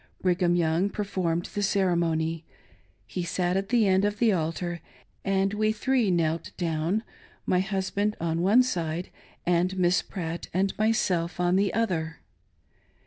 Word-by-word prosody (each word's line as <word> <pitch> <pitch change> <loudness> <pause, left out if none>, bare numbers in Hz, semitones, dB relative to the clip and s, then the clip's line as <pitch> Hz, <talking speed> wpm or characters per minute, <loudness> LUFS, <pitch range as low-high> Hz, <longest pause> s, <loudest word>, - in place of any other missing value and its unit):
Brig 180 0 +1
ham 175 -1 +3
Young 170 +3 +2
performed 185 -5 -2
the 205 - -2
ceremony. 170 -5 +1 0.6
He 180 - -4
sat 175 +1 -1
at 195 +1 -1
the 235 -3 +3
end 190 0 +3
of 205 0 0
the 230 0 +3
altar 170 0 -2 0.4
and 195 0 +1
we 215 +1 +1
three 240 0 +1
knelt 165 -2 0
down 170 +5 -1 0.2
— - - -29
my - - +4
husband 195 +2 -1
on 165 0 -1
one 210 +8 +5
side 170 -7 -3 0.3
and 180 +2 +1
Miss 180 0 +3
Pratt 170 -3 -5
and 195 +1 +1
myself 185 -6 +1
on 180 0 +2
the 200 0 +2
other. 170 -8 -1
180 Hz, 150 wpm, -27 LUFS, 170-200 Hz, 0.6 s, one